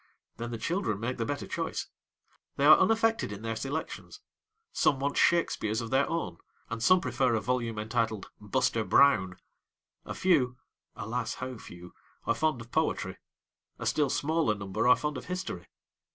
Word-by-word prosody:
then 120 0 -4
the 115 - -4
children 165 - -1
make 120 +3 -3
the 115 - -1
better 145 -1 -3
choice. - - -3 0.7
They 140 - +1
are 155 - +9
unaffected 225 - +2
in 105 +1 -7
their 115 0 -2
selections; 140 +7 -5 0.5
some 135 - +2
want 140 +1 -1
Shakespeares 110 -10 +2
of 115 -2 -5
their 135 +1 +3
own, 125 - -3 0.3
and 115 0 -3
some 185 +9 +5
prefer 130 -7 +1
a - - +1
volume 120 -1 -1
entitled 110 -1 -2
Buster 110 +1 0
Brown. 95 -10 +4 0.7
A - - -6
few 135 -9 +2 0.4
alas, 115 +2 -3
how 130 0 -5
few! 90 -1 -12 0.3
are - - +2
fond 155 -6 0
of 115 +1 -12
poetry; - - -1 0.6
a - - -6
still 150 -3 +2
smaller 155 -7 +1
number 100 +2 -2
are 125 - +8
fond 150 -2 -3
of - - -12
history. 180 - -5
125 Hz, 165 wpm, -29 LUFS, 110-150 Hz, 0.7 s, are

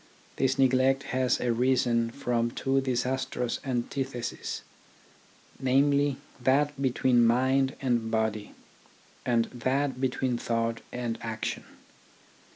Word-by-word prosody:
This 135 0 +1
neglect 135 +1 +3
has 130 -1 +2
arisen 120 -1 +2
from 120 -2 -1
two 135 +2 0
disastrous 125 -1 -1
antitheses, 130 -1 -3 1.0
namely, 140 +1 +3 0.2
that 140 +2 +2
between 125 -2 +3
mind 130 +3 +3
and 120 -4 0
body, 110 -2 -1 0.7
and 120 -2 +3
that 130 +2 -1
between 130 -2 0
thought 115 -1 -1
and 120 -2 -3
action. 115 -1 -4
125 Hz, 95 wpm, -28 LUFS, 120-135 Hz, 1.0 s, neglect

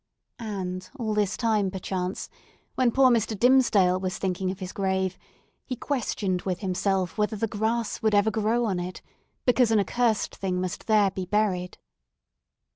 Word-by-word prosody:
And 185 -4 -5
all 220 -4 -2
this 210 -1 0
time, 215 -4 +1
perchance, 185 0 -4 0.5
when 250 -2 +2
poor 260 +1 +5
Mr. 225 -2 +1
Dimmesdale 210 -7 +4
was 185 -1 -3
thinking 185 0 -1
of 190 - -4
his 185 -1 -5
grave, 190 -1 0 0.5
he 255 - -4
questioned 210 -9 -2
with 185 -2 -3
himself 190 0 -1
whether 210 +1 +1
the 215 - -1
grass 220 +2 -1
would 220 -1 +2
ever 205 +2 +3
grow 225 +3 +1
on 190 -5 -1
it, 180 +1 -6 0.4
because 245 -1 +4
an 220 -1 +4
accursed 225 +2 0
thing 185 -2 -2
must 185 -1 -4
there 210 -3 +4
be 185 -1 -5
buried! 185 -3 0
205 Hz, 160 wpm, -26 LUFS, 185-225 Hz, 0.5 s, poor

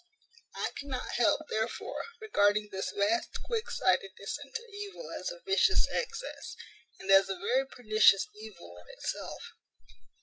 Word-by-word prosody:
I - - -1
cannot 270 -3 -4
help, 230 +3 +4
therefore, 220 +2 -2
regarding 210 - +2
this 190 0 -2
vast 205 +3 +1
quick 465 0 -2
sightedness 195 - 0
into 375 - -6
evil 410 +3 -7
as - - -3
a - - -8
vicious 415 +2 +4
excess, 480 +1 -4 0.4
and 195 - -1
as 195 0 +7
a 195 - -1
very 240 +9 +1
pernicious 215 -5 +4
evil 205 - -11
in 90 - -17
itself. - - -5
225 Hz, 135 wpm, -31 LUFS, -, 0.4 s, as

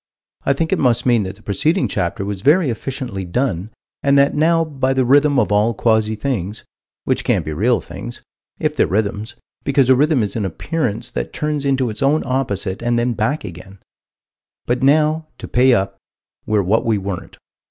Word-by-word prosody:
I 140 - +5
think 160 +5 -1
it 190 - 0
must 125 -4 +2
mean 120 -3 +4
that 95 +1 -6
the 105 - -21
preceding 155 - +1
chapter 90 +3 -2
was 100 -2 -4
very 150 - +4
efficiently 120 -4 -4
done, 95 -1 -2 0.3
and 140 0 +3
that 140 0 +4
now 165 +2 +3
by 135 -3 -1
the 130 -1 +1
rhythm 145 +2 +4
of 110 -5 +2
all 105 +3 +2
quasi 110 -1 +2
things 105 -3 -3 0.4
which - - 0
can't - - +1
be 75 - -3
real 115 +10 +2
things, 120 +1 -9 0.3
if - - -1
they're - - +2
rhythms, 105 +4 -2 0.3
because 135 -2 +2
a 130 - +7
rhythm 145 -2 +3
is 105 - -3
an 110 - -1
appearance 115 - -2
that - - -4
turns 150 -2 -2
into 130 -4 +1
its 105 - -8
own 140 +3 +2
opposite 120 -7 -2
and 120 0 +1
then 120 +1 +1
back 115 +8 -1
again 90 +3 -10 0.9
but 120 +1 0
now, 155 +3 +3
to - - -8
pay 130 +2 +4
up, 95 -4 +1 0.5
we're 105 -2 +2
what 105 +5 +2
we 115 -2 +1
weren't. 100 -2 -6
120 Hz, 190 wpm, -19 LUFS, 105-140 Hz, 0.9 s, a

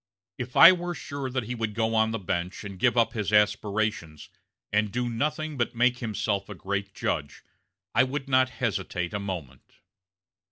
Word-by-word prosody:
If 125 0 -5
I 170 - +11
were 175 -1 -2
sure 140 -4 -5
that 130 -1 -2
he 120 +3 -4
would 110 -3 -3
go 115 0 0
on 110 0 +3
the 115 - -2
bench 90 -2 -3
and 100 -3 -8
give 125 +3 +2
up 115 -1 +3
his 105 -3 -2
aspirations, 105 -6 0 0.4
and 105 0 +2
do 125 +2 -1
nothing 150 +5 -2
but 120 0 -1
make 125 +1 +2
himself 105 -3 -2
a 105 - -7
great 100 +2 -4
judge, 70 -4 -3 0.5
I - - +5
would 135 +2 -3
not 130 -1 +3
hesitate 95 -7 -3
a 100 - -1
moment." 85 -10 -7
110 Hz, 175 wpm, -27 LUFS, 100-125 Hz, 0.5 s, I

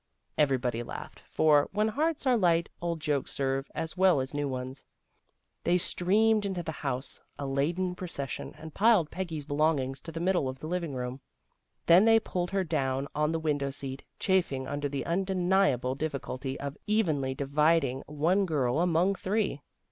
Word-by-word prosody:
Everybody 130 -5 +1
laughed, 120 - -8
for, 150 -2 +4
when 210 +2 +2
hearts 305 +6 -1
are 255 -2 +4
light, 170 -5 +2
old 170 -1 -2
jokes 145 -3 -1
serve 135 0 -1
as 160 +1 -3
well 185 -5 +4
as 130 +1 -3
new 145 0 -1
ones. 130 +1 -5 0.8
They 175 +1 +3
streamed 210 +5 +2
into 190 -3 -2
the 160 - -3
house, 135 -3 -4 0.2
a 145 - -4
laden 165 +7 0
procession, 165 -7 -5
and 160 -1 -10
piled 205 -7 +4
Peggy's 165 -6 -4
belongings 145 -3 0
in - - -4
the 165 - -4
middle 175 -6 +1
of 130 - -6
the 145 - -9
living 170 -3 -2
room. 125 +1 -4 0.6
Then 175 +5 +7
they 225 0 +6
pulled 180 -5 -3
her 195 0 0
down 135 -4 -1
on 150 +1 +1
the 165 - 0
window 145 -3 0
seat, 135 -1 -6
chafing 170 -9 0
under 145 0 -2
the 140 -1 -3
unde 185 +3 0
niable 180 -9 +2
difficulty 135 -2 -4
of 140 0 -5
evenly 155 -12 +1
dividing 140 -1 +2
one 170 +7 +1
girl 140 -4 +1
among 175 +2 +3
three. 195 -6 -1
155 Hz, 170 wpm, -29 LUFS, 135-180 Hz, 0.8 s, Then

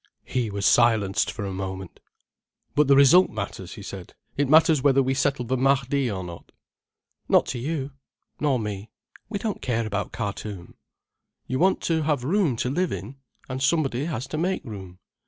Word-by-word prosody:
He 125 -4 -1
was 100 0 -3
silenced 110 -5 +3
for 105 - -5
a 95 - -4
moment. 95 -1 -6 0.7
"But 150 -1 +3
the 140 - +6
result 150 +7 +7
matters," 105 -3 -6
he - - -9
said. - - -9 0.2
"It 140 -1 0
matters 155 -1 +5
whether 135 -1 +4
we 130 +1 0
settle 135 -1 0
the 130 +3 0
Mahdi 135 0 +2
or 95 -3 -4
not." 85 -1 -10 0.8
"Not - - +5
to 125 - -3
you—nor 140 0 -4
me—we 105 - -7
don't 210 +1 -3
care 115 -2 -1
about 105 -1 -3
Khartoum." 100 -4 -5 0.7
"You 130 - -2
want 190 +3 +3
to 160 -1 0
have 150 -4 0
room 165 - +1
to 125 - -1
live 180 +4 0
in: 120 +8 -6 0.3
and 130 0 -5
somebody 135 -2 +1
has 135 -7 -3
to 155 - -3
make 185 +3 -1
room." 95 -6 -9
130 Hz, 170 wpm, -25 LUFS, 105-145 Hz, 0.8 s, result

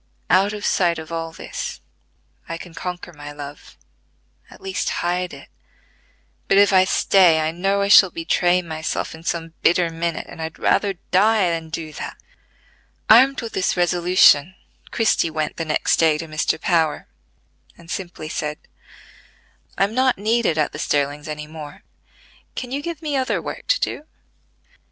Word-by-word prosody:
Out 190 +3 +4
of 210 -1 -6
sight 175 -3 +2
of 160 0 -9
all 165 0 -4
this, 165 - -6 0.7
I 165 - -4
can 170 0 -11
conquer 180 0 -6
my 145 -1 -9
love, 145 0 -10 0.7
at - - -15
least 190 -1 -3 0.2
hide 180 +1 -1
it; 140 -1 -12 1.0
but 195 - +3
if 200 0 +5
I 185 0 +6
stay 180 -4 +4
I 155 0 0
know 195 +4 0
I - - 0
shall 200 -1 +8
betray 175 +2 +1
myself 160 -1 -4
in 160 - -11
some 165 -1 -3
bitter 170 -1 +3
minute, 165 0 -3
and - - -10
I'd 160 0 -5
rather 200 -2 +1 0.2
die 200 -1 +3
than 165 -1 -4
do 160 -1 -6
that." - - -7 0.9
Armed 265 +5 +6
with 230 - -6
this 185 - 0
resolution, 175 -2 +4 0.3
Christie 220 -7 +1
went 155 -1 -3
the 165 - -3
next 155 - +1
day 160 -2 +3
to 165 - -5
Mr. 155 0 -1
Power, 160 -3 0 0.7
and 170 0 -12
simply 175 -4 -6
said: 150 -1 -3 1.2
"I - - +3
am 200 +2 0
not 260 +1 +2
needed 215 -4 +1
at 155 - +1
the 155 - -8
Sterlings 145 +1 -1
any 150 0 -5
more: 150 -1 -10 0.7
can 250 -1 -5
you 280 +2 -2
give 330 0 -6
me 295 -2 -2
other 260 -1 0
work - - -7
to - - +2
do?" 300 - -3
170 Hz, 165 wpm, -21 LUFS, 160-195 Hz, 1.2 s, shall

